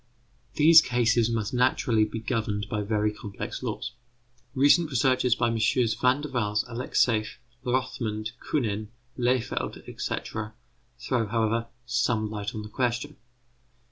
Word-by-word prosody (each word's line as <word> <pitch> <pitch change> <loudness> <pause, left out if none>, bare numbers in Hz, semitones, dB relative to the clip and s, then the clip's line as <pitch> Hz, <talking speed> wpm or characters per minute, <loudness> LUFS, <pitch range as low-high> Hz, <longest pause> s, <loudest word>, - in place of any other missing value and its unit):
These 160 +2 +8
cases 120 -2 +2
must 110 -2 -2
naturally 120 -3 +2
be 105 +1 -6
governed 105 -3 -2
by 105 0 -2
very 105 0 0
complex 100 -2 -6
laws. - - -4 0.6
Recent 145 +5 +5
researches 130 -2 +2
by 120 - +1
MM. 115 0 +1
Van 130 +3 +3
der 150 - -5
Waals, 105 -4 -1
Alexeif, 115 -2 0 0.3
Rothmund, 120 -4 -2
Künen, 110 -7 -1 0.3
Lehfeld, 125 -1 -1
etc., 110 -1 -4 0.4
throw, 120 -2 -1
however, 115 +1 0 0.2
some 120 -3 0
light 105 +1 -4
on 105 - -4
the 105 - -9
question. 120 +1 -2
115 Hz, 125 wpm, -27 LUFS, 110-125 Hz, 0.6 s, These